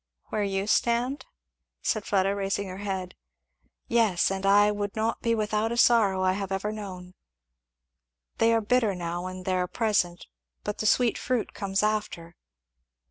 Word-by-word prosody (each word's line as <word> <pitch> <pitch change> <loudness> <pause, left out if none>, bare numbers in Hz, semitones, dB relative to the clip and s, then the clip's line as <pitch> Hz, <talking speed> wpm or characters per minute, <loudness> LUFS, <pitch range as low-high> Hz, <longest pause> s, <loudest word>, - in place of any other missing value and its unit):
"Where 215 - -1
you 195 0 -1
stand?" 240 +5 +1 0.6
said 215 - 0
Fleda 195 0 +2
raising 200 0 -2
her 185 +1 -7
head. 190 -3 -4 0.7
"Yes, 220 -7 +2
and 195 0 -2
I 205 +1 +5
would 205 -1 -3
not 220 +1 -1
be 230 -1 +1
without 215 +1 0
a 235 - -2
sorrow 215 -6 +4
I 185 - +3
have 195 0 -4
ever 195 +2 -1
known. 185 -4 -8 1.3
They 225 0 +4
are 225 0 +3
bitter 220 -2 +2
now, 175 0 -4
when 185 0 -6
they 185 - -1
are 180 -1 0
present, 190 -5 0 0.4
but 210 - -4
the 215 - 0
sweet 245 +1 +3
fruit 250 -3 -2
comes 195 0 -1
after." 205 -6 -2
205 Hz, 160 wpm, -27 LUFS, 190-220 Hz, 1.3 s, I